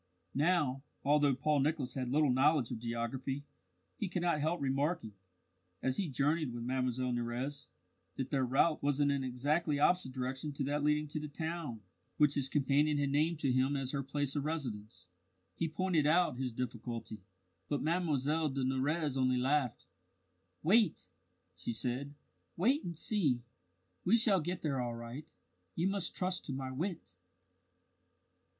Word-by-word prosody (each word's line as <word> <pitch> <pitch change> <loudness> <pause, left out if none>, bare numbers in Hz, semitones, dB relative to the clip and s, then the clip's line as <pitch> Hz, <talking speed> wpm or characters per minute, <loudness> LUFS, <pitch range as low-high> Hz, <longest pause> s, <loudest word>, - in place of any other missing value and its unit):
Now, 145 -3 +2 0.2
although 145 -1 +4
Paul 150 +2 +1
Nicholas 140 -3 0
had 130 -2 -3
little 145 +1 +3
knowledge 135 -1 +3
of 115 - -3
geography, 120 +4 -3 0.5
he 210 -6 -2
could 180 -1 -2
not 170 -3 +2
help 160 +4 0
remarking, 140 -2 -1 0.7
as 130 0 0
he 190 -5 -1
journeyed 145 +2 +1
with 120 0 -5
Mlle 125 0 -1
Nurrez, 125 +4 -3 0.5
that 130 -1 -4
their 135 -3 +2
route 135 +5 +2
was 145 0 +1
in 145 -1 +4
an 140 -1 0
exactly 145 +5 0
opposite 165 -1 +3
direction 130 +3 -3
to 140 - -2
that 145 +2 -1
leading 150 0 +2
to 155 - -3
the 150 - -5
town 160 -6 -4 0.4
which 150 -1 +5
his 135 -2 +1
companion 145 +1 +2
had 140 -1 +1
named 155 +3 +2
to 135 - +2
him 130 +3 +2
as 135 -2 -1
her 140 - -1
place 140 +1 -2
of 145 - 0
residence. 110 - -4 0.5
He 165 - 0
pointed 165 -2 +1
out 170 -1 +3
his 130 -2 -1
difficulty, 115 -2 -5 0.5
but 145 - 0
Mlle 165 -1 +1 0.3
de 135 -1 -2
Nurrez 140 +3 0
only 130 -1 +2
laughed. 130 -1 0 0.8
"Wait!" 190 - +3 0.5
she 90 +6 -3
said. 130 +5 -2 0.4
"Wait 255 - +3
and 170 -2 -5
see. 150 - +1 0.6
We 220 +6 +5
shall 210 -5 +5
get 175 +3 -3
there 140 -5 0
all 120 -1 -3
right. 120 +6 -8 0.5
You 170 +3 +1
must 195 -2 0
trust 185 0 -1
to 140 - -4
my 130 0 -4
wit." 160 - -4
140 Hz, 160 wpm, -34 LUFS, 130-155 Hz, 0.8 s, which